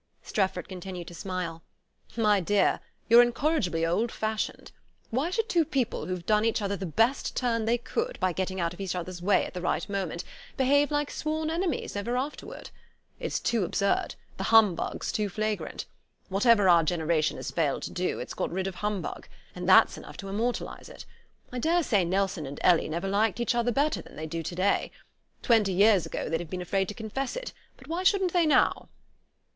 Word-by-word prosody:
Strefford 190 -3 -1
continued 180 -1 -7
to - - -11
smile. 170 -2 -4 0.6
"My 210 -3 +4
dear, 195 +2 +2 0.3
you're 235 +1 +8
incorrigibly 240 - +1
old 215 +8 0
fashioned. 220 0 -3 0.4
Why 265 +8 0
should 445 +4 -1
two 345 -7 +3
people 265 -5 -2
who've 180 -2 -4
done 210 +1 +3
each 230 0 +1
other 200 -1 -1
the 190 -1 -5
best 225 - +1
turn 230 -3 0
they 235 +2 +2
could 460 - -3
by 185 -1 +1
getting 190 +1 -2
out 170 -1 -1
of 175 - -9
each 190 -2 -2
other's 180 0 -5
way 200 +3 +3
at - - -8
the 180 - -5
right 175 - -1
moment 190 -4 -3 0.3
behave 285 +2 +3
like 295 -1 -1
sworn 310 0 -2
enemies 335 - -2
ever 235 +5 -1
afterward? 280 +4 -5 0.5
It's - - -2
too 230 -4 0
absurd; 200 +2 0 0.2
the - - -3
humbug's 220 -6 +3
too 210 -1 -1
flagrant. 215 +2 -3 0.4
Whatever 205 +1 +4
our 170 -2 +7
generation 160 -1 0
has - - -5
failed 150 -5 0
to - - -5
do, 180 0 -1
it's 125 - -6
got - - -2
rid 185 +2 -2
of 195 - -3
humbug; 210 -2 -3 0.3
and - - -4
that's - - +6
enough - - -11
to 195 - -7
immortalize 230 +5 -3
it. - - -11 0.5
I 250 - -4
daresay 310 - +2
Nelson 185 -3 -1
and 140 - -7
Ellie 175 -3 +4
never 170 +4 -2
liked 205 +3 +1
each 235 - +1
other 240 0 +1
better 285 +5 +1
than - - -15
they 155 - -5
do 165 +1 -4
to 170 +2 -5
day. 190 +3 +1 0.5
Twenty 220 -6 +3
years 200 -1 +4
ago, - - -4
they'd 165 +1 -1
have 175 - -7
been 185 - -4
afraid 190 +2 0
to 210 - -6
confess 235 +5 -4
it; - - -5 0.2
but - - -15
why 335 +3 -2
shouldn't 375 -1 +2
they 345 -3 +3
now?" 300 - +2
205 Hz, 195 wpm, -28 LUFS, 180-245 Hz, 0.6 s, you're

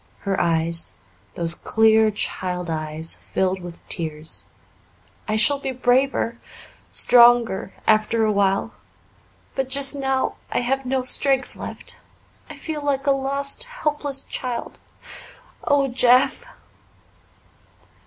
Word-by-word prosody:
Her 195 -1 -1
eyes, 165 - 0 0.4
those 170 -1 +1
clear 220 +3 +3
child 180 -4 -3
eyes, 155 0 -3
filled 190 0 -2
with 175 -1 -11
tears. 155 -2 -2 0.8
"I 215 - -1
shall 280 +6 +4
be 270 - -4
braver 250 -1 +1 0.5
stronger 235 -5 +4
after 220 +1 +2
a 215 - +1
while. 200 -1 0 0.8
But 265 -1 -3
just 275 +1 +1
now 270 -2 -1
I - - 0
have 265 +2 -2
no 260 0 0
strength 265 +1 +3
left. - - -8 0.5
I - - -9
feel 310 -2 -5
like 275 -1 -1
a 280 - +3
lost, 275 - 0
helpless 295 - -3
child. 245 -2 -5 0.9
Oh, 285 -2 +2
Jeff!" 250 - +3
240 Hz, 115 wpm, -22 LUFS, 190-270 Hz, 0.9 s, shall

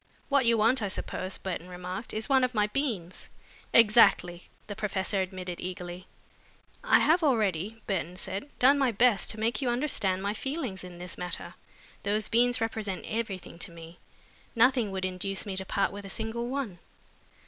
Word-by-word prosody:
"What 275 -4 +3
you 230 -1 +5
want, 230 +4 +3
I 205 - 0
suppose," 190 0 -4
Burton 180 -2 -5
remarked, 180 +4 -6
"is 215 +1 -3
one 265 -2 +4
of 255 -1 0
my 210 -1 +3
beans." 210 - -3 0.4
"Exactly," 210 -6 +5 0.2
the 205 - -6
professor 195 -1 -1
admitted, 185 -2 -5
eagerly. 180 0 -6 0.8
"I - - +6
have 335 +4 +4
already," 220 - 0
Burton 180 -3 -2
said, 200 +9 -4
"done 275 +3 +5
my 265 -3 +3
best 225 -2 +3
to 215 - -5
make 230 +5 0
you 255 - +1
understand 240 -8 +1
my 200 +1 0
feelings 260 - -4
in 180 -1 -9
this 180 0 -6
matter. 180 0 -5 0.5
Those 210 +1 0
beans 245 +2 +3
represent 220 -4 -3
everything 200 -6 -4
to 185 - -3
me. 165 0 -12 0.6
Nothing 245 -1 +4
would 190 -1 -2
induce 190 +2 -1
me 200 -2 -4
to 190 0 -1
part 195 +1 +1
with 205 0 -8
a 195 - -8
single 225 +3 -2
one." 255 -10 -3
205 Hz, 170 wpm, -29 LUFS, 185-235 Hz, 0.8 s, I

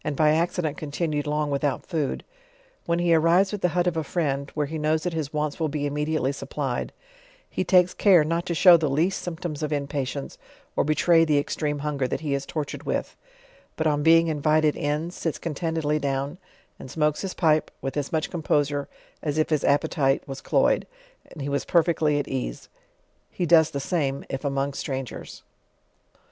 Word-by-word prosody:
by 150 +1 +4
accident 160 -1 0
continued 150 0 -2
long 150 0 -1
without 140 -1 -1
food, 155 -6 -2 0.6
when 170 - +1
he 175 -1 +2
arrives 170 +5 +4
at 205 - -4
the 180 - +2
hut 175 - +3
of 175 -2 0
a 160 - -1
friend, 140 -3 -2
where 150 -1 0
he 155 +2 -5
knows 155 +1 +1
that 180 - -2
his 155 -3 -3
wants 150 0 -2
will 160 -2 0
be 145 0 -2
immediately 150 -1 0
supplied, 140 -2 -4 0.6
he - - -2
takes 180 0 +4
cure 185 -6 +5
not 165 +3 -1
to 175 -2 -3
show 175 +1 +8
the 155 -3 -1
least 165 +8 +1
symptoms 165 -3 -5
of 155 -1 -2
impatience, 140 -1 -3 0.4
or - - +2
betray 165 +3 +4
the 155 -3 +2
extreme 145 +1 -1
hunger 140 -3 -1
that - - -3
he 150 -3 -2
is 140 0 -2
tortured 150 -3 -4
with; - - -3 0.6
but 160 - -2
on 150 -1 +2
being 165 +2 +5
invited 155 0 +2
in, 150 +3 -2
sits 165 -3 -3
contentedly 160 -1 -1
down, 140 +3 -2 0.4
and 130 - -9
smokes 150 +1 0
his 190 -2 -4
pipe 155 -3 +2
with 135 - -4
as 145 -2 -2
much 160 -1 -1
composure 145 -4 0 0.3
as 150 -1 -2
if 155 - +1
Jiis 155 -3 +1
appetite 140 -1 +1
was 135 -1 -7
cloyed, - - +2 0.4
and 150 - -7
he - - -3
was 140 0 -1
.perfectly 160 -3 +2
at 145 - -2
ease: 125 - -4 0.6
he 180 - -2
does 160 -2 +5
the 140 - -4
same 140 -3 -1
if 135 - -4
among 140 0 -1
strangers. 135 -2 -6
150 Hz, 185 wpm, -25 LUFS, 145-165 Hz, 0.6 s, show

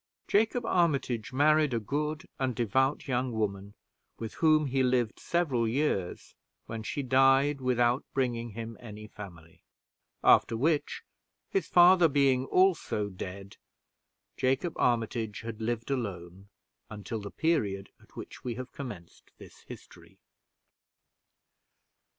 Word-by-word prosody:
Jacob 225 +3 +1
Armitage 140 - 0
married 150 0 +3
a - - +1
good 150 - -3
and 130 -3 -1
devout 130 +7 0
young 125 -1 -1
woman, 100 -2 -3 0.4
with 115 -2 -6
whom 155 -2 +3
he 135 -1 0
lived 125 -3 +1
several 140 -10 0
years, 110 -8 -2 0.3
when 115 0 -6
she 140 +6 -4
died, 135 +2 +3
without 125 0 +2
bringing 120 -3 -1
him 115 +1 -6
any 105 -2 -10
family; 85 -6 -12 0.6
after 115 - +5
which, 150 +4 0 0.5
his 390 - 0
father 175 0 +6
being 135 -3 +2
also 170 - +1
dead, 95 +1 -8 0.8
Jacob 135 +6 0
Armitage 115 -2 -1
had 115 -1 -7
lived 115 +3 -2
alone 95 -6 -5 0.4
until 110 +1 -6
the 100 - -7
period 100 -11 -1
at - - -23
which - - -9
we 120 -2 -3
have 130 +1 -7
commenced 105 -12 -9
this - - -14
history. - - -13
125 Hz, 120 wpm, -29 LUFS, 110-145 Hz, 0.8 s, father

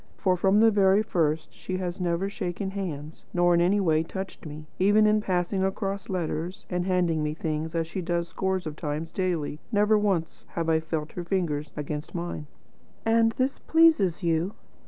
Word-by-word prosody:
For 185 -2 +2
from 195 +3 +3
the 225 0 +6
very 200 0 +4
first 160 -6 0
she 185 - -4
has 185 0 -4
never 175 +2 0
shaken 190 0 -4
hands, 160 -6 -5
nor 175 0 +4
in 170 - +4
any 190 +4 +3
way 160 -5 +3
touched 190 0 -6
me. 150 +1 -8
Even 205 +3 +5
in 215 0 +4
passing 185 0 0
across 195 0 -2
letters, 175 0 -3
and 180 0 -1
handing 175 -4 +1
me 150 0 -1
things, 160 0 -3
as 165 -1 +1
she 185 +4 -5
does 170 -1 -1
scores 190 +1 -2
of 155 -1 -5
times 155 +1 -4
daily, 170 -6 -2
never 210 0 +4
once 190 -6 -1
have 165 -1 -1
I 160 0 +4
felt 160 -1 -4
her 175 - -5
fingers 170 -5 -1
against 150 +1 -5
mine." 170 -3 -4 0.6
"And 225 0 +4
this 260 +3 -1
pleases 310 - +4
you?" 170 +3 0
175 Hz, 180 wpm, -27 LUFS, 160-195 Hz, 0.6 s, the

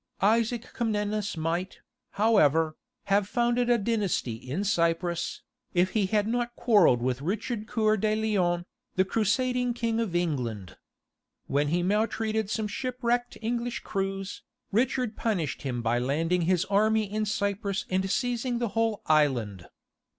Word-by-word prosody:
Isaac 230 +3 +1
Comnenus 210 -4 -1
might, 170 +4 -2 0.4
however, 165 -8 +3 0.3
have 200 0 +2
founded 240 +2 +1
a 240 - +5
dynasty 205 - 0
in 130 - -4
Cyprus, 170 -2 0 0.3
if 180 +1 +3
he 205 -4 +1
had 210 +1 +1
not 240 +1 -1
quarrelled 180 - +4
with 130 +1 -1
Richard 215 - -3
Coeur 215 -1 +2
de 215 +1 +1
Lion, 185 -6 +1 0.3
the 185 - +3
crusading 245 +4 +1
King 230 -1 -1
of 215 -7 -2
England. 120 - -2 0.7
When 145 +1 +1
he 175 +4 +1
maltreated 220 +1 0
some 215 0 -1
shipwrecked 245 +1 -2
English 235 +1 -2
crews, 195 0 -3 0.3
Richard 240 +1 +1
punished 185 -11 -1
him 125 -3 -3
by 120 +1 +1
landing 165 +8 0
his 185 -1 +2
army 215 +2 +3
in 215 +1 -2
Cyprus 200 -1 -1
and 190 +1 0
seizing 245 +3 0
the 235 -1 -1
whole 225 -1 0
island. 120 - +1
205 Hz, 135 wpm, -28 LUFS, 170-230 Hz, 0.7 s, a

